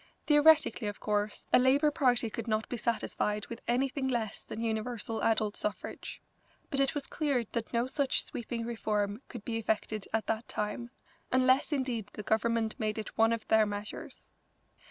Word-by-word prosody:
Theoretically, 295 -6 +5
of 205 - -4
course, 210 0 -1
a - - +8
Labour 280 +4 +4
party 245 -5 +2
could 230 +1 -5
not 215 -1 0
be - - -3
satisfied 215 -2 -1
with 235 - -7
anything 265 +2 +1
less 230 -5 -2
than - - -7
universal 225 0 -2
adult 220 -2 +2
suffrage, 210 - -4 0.5
but 275 - 0
it 275 +1 +2
was 285 -2 -2
clear 280 -6 0
that 230 -2 -3
no 235 0 +1
such 265 +1 +1
sweeping 235 -1 -4
reform 215 -2 -1
could 235 -5 -9
be 230 -1 -1
effected 215 -1 -1
at 220 0 0
that 225 +1 -2
time, 210 +3 -3 0.4
unless 260 +3 +4
indeed 250 -7 -1
the 210 - -6
Government 225 +1 +1
made 215 0 -1
it 220 - -5
one 225 +1 +4
of 230 -1 -2
their 220 -1 +5
measures. 205 0 -7
230 Hz, 170 wpm, -31 LUFS, 215-255 Hz, 0.5 s, a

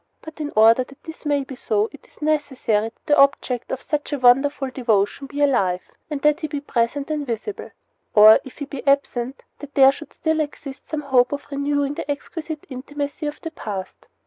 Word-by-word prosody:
But 315 0 -11
in 300 -1 -3
order 225 +3 +6
that 275 +2 -18
this 320 -1 -9
may 285 -1 +1
be 265 0 -9
so 215 -3 0
it 290 - -15
is - - -14
necessary 270 -8 0
that - - -38
the 295 - +4
object 275 -3 +2
of 265 - -4
such 300 0 -2
a 290 - 0
wonderful 270 +2 +3
devotion 235 +1 0
be 290 +1 -4
alive, 190 -10 +2 0.3
that 300 +1 +2
he 310 - -3
be 295 -1 -3
present 275 +2 -1
and 300 -1 -1
visible; 245 - -5 0.5
or, 215 +1 +9
if 265 - -12
he 285 - -4
be 280 -1 -7
absent, 270 -2 +1 0.2
that 290 -1 -11
there 270 -1 +8
should 305 +3 -11
still 315 0 0
exist 285 -2 -5
some 310 -1 -2
hope 255 -3 +3
of 285 0 -4
renewing 285 0 0
the 290 - -6
exquisite 310 +2 -5
intimacy 285 +3 -4
of 295 - -6
the 325 - -5
past. 200 - -7
280 Hz, 200 wpm, -22 LUFS, 250-295 Hz, 0.5 s, or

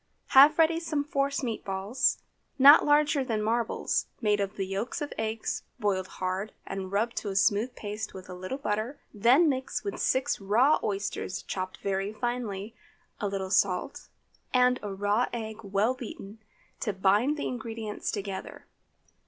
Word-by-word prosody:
Have 285 +3 +8
ready 325 0 +4
some 310 -4 -1
force 280 -1 -1
meat 230 -3 -3
balls, 195 +6 0 0.4
not 285 +3 +9
larger 295 -1 +3
than 230 -4 -1
marbles, 230 +1 0
made 210 -2 +2
of 200 0 -2
the 195 - -2
yolks 195 +5 -3
of 295 - -4
the - - -4
eggs 220 0 -2 0.2
boiled 195 -4 0
hard 185 +3 -3
and 190 -1 -5
rubbed 220 +4 0
to 205 - -2
a 195 - -4
smooth 205 +5 +2
paste 210 +1 -5
with 185 -1 -10
a 185 - -8
little 185 +8 -5
butter, 220 +1 -2
then 245 +11 +5
mix 260 -3 -1
with 400 -1 -4
six 260 -3 +1
raw 235 +10 +4
oysters 200 -2 -3
chopped 185 -1 -4
very 195 +1 -1
finely, 225 -3 -3 0.5
a 205 - -1
little 195 -1 -3
salt, 190 -2 0 0.5
and 250 0 +4
a 205 - -5
raw 205 +5 +1
egg 220 -2 -5
well 200 +4 +1
beaten, 220 -4 -9 0.4
to 210 - -1
bind 205 +10 +2
the - - -2
ingredients 225 -3 -5
together. 195 -2 -5
215 Hz, 160 wpm, -28 LUFS, 195-255 Hz, 0.5 s, not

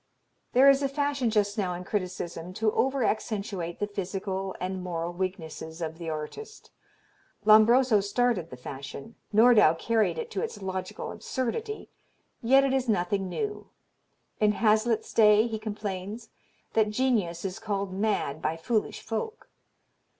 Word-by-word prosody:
There 260 +3 +6
is 275 0 +6
a 275 - +1
fashion 280 -3 0
just 210 -1 +1
now 180 -3 -1
in 180 - -6
criticism 180 -3 -4
to 215 +2 +1
over 265 +3 +1
accentuate 200 -6 -2
the 205 - -1
physical 195 -1 -4
and 185 0 -3
moral 170 -1 -3
weaknesses 170 -3 -5
of 160 0 -5
the 165 -1 -4
artist. 160 - -7 0.7
Lombroso 220 +2 +6
started 200 -3 0
the 125 - -9
fashion, 140 - -8 0.2
Nordau 215 -6 +6
carried 220 +5 +1
it 470 -1 -5
to - - -2
its 460 0 -4
logical 190 -1 -4
absurdity, 425 - -4 0.5
yet 270 +4 +5
it 270 -1 +1
is 260 -2 0
nothing 195 -1 0
new. 420 - -4 0.7
In 210 -1 +4
Hazlitt's 220 +1 +2
day 210 0 +6
he 220 -2 -3
complains, 210 0 -5 0.4
that 215 -1 +3
genius 210 -8 0
is 190 +2 -4
called 200 -3 -3
mad 190 -7 -1
by 160 +1 -1
foolish 215 +6 -1
folk. 430 - -5
210 Hz, 145 wpm, -28 LUFS, 180-235 Hz, 0.7 s, There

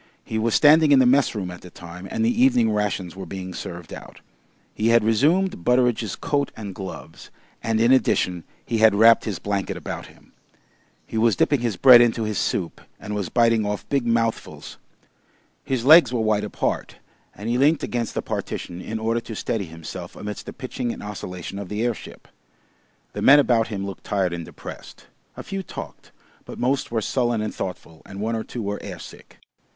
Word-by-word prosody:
He 110 - -3
was 115 0 +1
standing 155 0 +6
in 140 - +7
the 130 - +5
messroom 120 -8 +2
at 90 - -10
the 90 - -12
time 90 +2 -10
and 225 - -1
the 240 +1 +2
evening 120 - +4
rations 105 -4 -2
were 95 -2 -8
being 95 0 -6
served 85 -2 -8
out. - - -11 0.5
He 110 - -1
had 115 -1 +5
resumed 145 - +2
Butteridge's 125 -2 +1
coat 140 -1 -1
and 105 -3 -6
gloves, 95 0 -9 0.3
and 110 0 0
in 115 +2 +4
addition 90 -9 +2 0.2
he 115 - -1
had 110 -2 +5
wrapped 115 +2 +6
his 105 -5 -3
blanket 100 -1 -3
about - - -6
him. - - -21 0.7
He 110 - -3
was 115 -2 +3
dipping 145 +9 +2
his 115 -4 -1
bread 125 -3 +9
into 115 -1 +2
his 105 -2 -2
soup 85 -3 -2 0.2
and 105 0 -6
was 100 -4 -3
biting 115 -2 +3
off 105 0 -4
big 140 -3 +1
mouthfuls. 115 -1 -2 0.8
His 130 -3 -2
legs 160 0 +8
were 125 - -1
wide 110 -1 +1
apart, 105 - -3 0.4
and 105 +3 -7
he 120 +2 0
leant 150 +3 +3
against 120 -2 -3
the - - -2
partition 90 +1 -5
in 110 - -5
order 115 +1 0
to 115 -1 -8
steady 105 -1 -2
himself 80 -1 -9
amidst 105 0 -7
the - - -5
pitching 130 -2 -4
and - - -8
oscillation 95 -2 -6
of 100 -3 -7
the 105 +2 -2
airship. 120 -2 -5 0.9
The - - -5
men 140 +2 +8
about 120 -5 +3
him 100 -3 -4
looked 100 -1 -8
tired 95 -3 0
and 85 -1 -5
depressed; - - -11 0.3
a - - -6
few 195 0 -4
talked, 190 - -9 0.3
but - - -10
most 130 +2 0
were 115 -1 -1
sullen 120 0 0
and 110 - -4
thoughtful, 90 -4 -7
and 100 - -10
one 110 +2 -1
or 110 - -3
two 120 - -6
were 100 0 -4
air - - -7
sick. - - -13
110 Hz, 195 wpm, -23 LUFS, 100-125 Hz, 0.9 s, bread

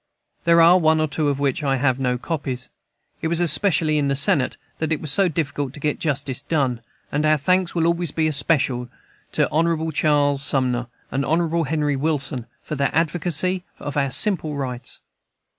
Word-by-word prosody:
There 170 0 +5
are 175 +2 +6
one 160 -1 +3
or 155 - +1
two 150 +1 -1
of 140 - -1
which 140 -1 0
I 135 -1 +1
have 130 -1 +1
no 125 -2 0
copies. 130 -4 -4 0.5
It - - -1
was 170 +1 +1
especially 160 -2 +2
in 140 - 0
the 140 - 0
Senate 135 -1 +3 0.2
that 160 0 -2
it 155 - 0
was 155 - -3
so 195 +5 +3
difficult 145 -4 -3
to - - -9
get 150 0 -2
justice 140 -4 -2
done; 135 -6 -1 0.3
and 145 +1 0
our 155 0 +3
thanks 180 +4 0
will 165 -1 +1
always 170 0 +1
be 160 +2 -1
especially 140 -4 +1 0.5
due - - +1
to - - 0
Hon. 160 0 0
Charles 145 -2 +2
Sumner 125 -3 +1 0.2
and 135 +1 -1
Hon. 165 +2 0
Henry 150 0 0
Wilson 135 -4 -2 0.2
for - - -6
their 140 -2 0
advocacy 175 +2 0
of 145 - -6
our 140 -2 +1
simple 160 - +2
rights. 130 -3 -5
150 Hz, 190 wpm, -22 LUFS, 135-165 Hz, 0.5 s, are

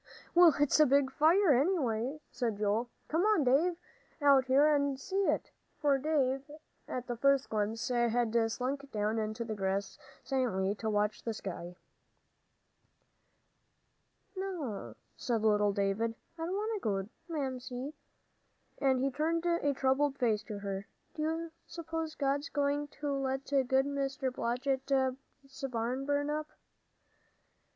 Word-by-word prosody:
"Well, 345 -2 +7
it's 290 +1 +3
a 305 - +7
big 275 0 +3
fire, 320 +4 +5
anyway," 265 - +1
said 235 -4 -2
Joel. 215 +3 0 0.2
"Come 325 +3 +1
on, 420 -5 +3
Dave, 295 +8 +3 0.4
out 280 -3 +5
here 270 +3 +5
and 280 -2 +1
see 390 +7 -1
it," - - 0 0.3
for 285 -3 +3
Dave, 270 -3 +1 0.5
at 250 -1 -4
the 240 - -3
first 275 +2 +3
glimpse, 220 +2 -1
had 235 -2 +2
slunk 275 +4 -3
down 215 +1 0
on 215 0 -2
the 225 0 -4
grass 195 0 -2 0.2
silently 220 -8 0
to 220 +1 -3
watch 210 0 0
the 225 -2 -3
sky. 180 -3 -6 2.6
"No," 290 - -4 0.2
said 230 -3 -1
little 210 -1 +4
David, 200 +3 0 0.2
"I 325 0 -4
don't 370 - -2
want 425 0 -2
to - - -30
go, 195 -2 0
Joel. 195 - -14 0.2
Mamsie 265 -2 -4 0.5
" - - -42
and 265 -2 +3
he 270 +1 +1
turned 325 +4 0
a 340 -4 +2
troubled 270 +1 +1
face 225 -5 +1
to 205 0 -5
her 200 0 -4 0.3
"do 310 - -5
you 325 +1 -2 0.2
suppose 325 -1 -4
God's 285 +1 0
going 285 0 0
to 290 -1 -1
let 270 0 -2
good 270 -3 +2 0.2
Mr. 275 -2 -2
Blodgett's 265 +2 0 0.6
barn 250 +3 -2
burn 290 0 +1
up?" 305 0 -2
265 Hz, 145 wpm, -32 LUFS, 225-290 Hz, 2.6 s, Well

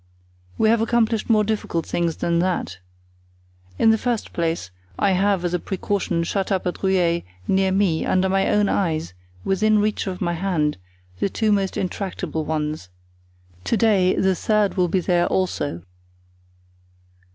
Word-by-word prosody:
We 220 - +3
have 230 0 +3
accomplished 225 -1 +1
more 215 -2 +4
difficult 205 -6 -2
things 170 -2 -1
than 170 0 0
that. 170 - -1 1.0
In 225 - +5
the 220 - +2
first 240 -2 -2
place 165 - -2 0.3
I 200 - +2
have 190 -1 +1
as 175 - -1
a 180 - +1
precaution 190 -3 -2
shut 195 +3 -2
up 190 -2 0
at 180 - -3
Rueil, 180 -3 +2 0.3
near 190 0 +2
me, 190 -4 +1
under 185 +1 +2
my 195 0 +1
own 210 -1 +3
eyes, 160 - -1 0.3
within 215 +3 +2
reach 210 0 0
of 185 -1 -4
my 175 -2 -1
hand, 165 - -1 0.4
the - - 0
two 215 +2 0
most 195 -2 0
intractable 180 -4 -3
ones. 150 - -3 0.8
To 230 - +1
day 195 -4 +3
the 190 0 +2
third 210 +2 +1
will 180 -2 +2
be 185 +2 0
there 175 0 +2
also." 145 - -1
190 Hz, 155 wpm, -22 LUFS, 170-205 Hz, 1.0 s, In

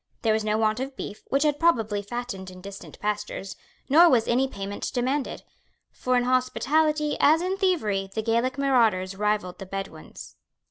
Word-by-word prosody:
There 220 -2 +3
was 220 0 0
no 215 0 +1
want 220 +1 +1
of 270 +1 -4
beef, 210 - -7
which 275 +2 +1
had 295 -1 +1
probably 225 -11 +2
fattened 205 -3 -6
in 185 0 -12
distant 200 +1 -10
pastures; 210 -2 -3 0.3
nor 335 +5 +7
was 235 -6 +3
any 255 +3 +2
payment 200 -4 -5
demanded; 260 +3 -2 0.5
for 255 0 0
in 245 - +2
hospitality, 300 +4 +1
as 315 +2 +5
in 365 +2 -1
thievery, 220 - 0
the 220 +2 -3
Gaelic 235 +4 0
marauders 225 -9 +2
rivalled 210 -3 -1
the 195 - -8
Bedouins. 195 +1 -8
235 Hz, 170 wpm, -25 LUFS, 205-275 Hz, 0.5 s, nor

